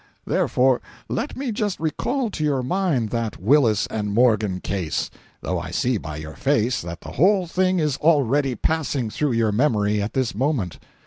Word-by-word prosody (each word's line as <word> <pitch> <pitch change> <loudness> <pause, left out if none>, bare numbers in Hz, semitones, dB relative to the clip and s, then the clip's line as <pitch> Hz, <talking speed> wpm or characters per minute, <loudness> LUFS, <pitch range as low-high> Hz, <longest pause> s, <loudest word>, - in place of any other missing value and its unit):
Therefore, 125 0 +2 0.3
let 295 - -3
me 265 -2 -2
just 205 -2 -2
recall 225 - -1
to 155 - -3
your 140 -4 +1
mind 140 - 0
that 115 -3 -2
Willis 115 -1 +3
and 105 -2 -3
Morgan 110 -4 +2
case—though 90 -7 -4
I - - -6
see 125 -3 0
by 75 -3 -7
your 80 +1 -7
face 130 -4 +1
that 85 -1 -7
the - - -9
whole 190 +5 +3
thing 185 +2 +1
is 150 -5 0
already 140 -4 +2
passing 140 -4 -1
through 145 0 0
your 115 -2 +2
memory 105 -4 +1
at 100 - -3
this 130 -3 0
moment. 120 - -1
125 Hz, 170 wpm, -23 LUFS, 105-155 Hz, 0.3 s, Willis